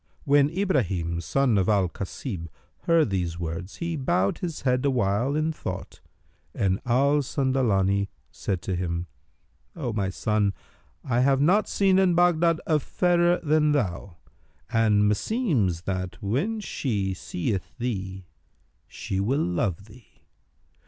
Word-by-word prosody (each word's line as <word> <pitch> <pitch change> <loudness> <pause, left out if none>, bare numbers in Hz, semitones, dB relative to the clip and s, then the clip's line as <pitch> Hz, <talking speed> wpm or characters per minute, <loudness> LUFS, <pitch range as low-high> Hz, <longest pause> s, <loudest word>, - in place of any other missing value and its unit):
When 145 0 +4
Ibrahim 100 - 0
son 125 +1 +2
of 95 - +1
Al 100 -3 +3
Kasib 95 - -6 0.4
heard 165 -9 +3
these 90 -3 -2
words, 85 +3 -5
he 170 -1 -3
bowed 100 -9 0
his 170 -4 -4
head 125 -1 +1
awhile 125 0 +1
in 155 +1 0
thought 95 -10 -7 0.5
and 95 -1 0
Al 140 +4 +3
Sandalani 110 -8 +1 0.2
said 95 -4 -3
to 95 - -2
him, 85 -1 -2 0.7
"O 130 -8 -3
my 100 -3 -1
son, 105 +1 0 0.5
I 120 -2 0
have 135 +1 +3
not 185 +9 +3
seen 190 -1 +3
in 185 -3 +3
Baghdad 170 -1 +3
a 155 -2 +2
fairer 175 +2 +2
than 150 -1 +3
thou, 95 - -2 0.5
and 110 -2 +3
meseems 105 - 0
that, 95 -1 -3
when 145 - -1
she 105 - -2
seeth 95 +3 -4
thee, 95 -6 -4 0.6
she 95 - -4
will 130 +10 +1
love 90 +2 -1
thee. 110 +2 -19
115 Hz, 130 wpm, -26 LUFS, 95-150 Hz, 0.7 s, When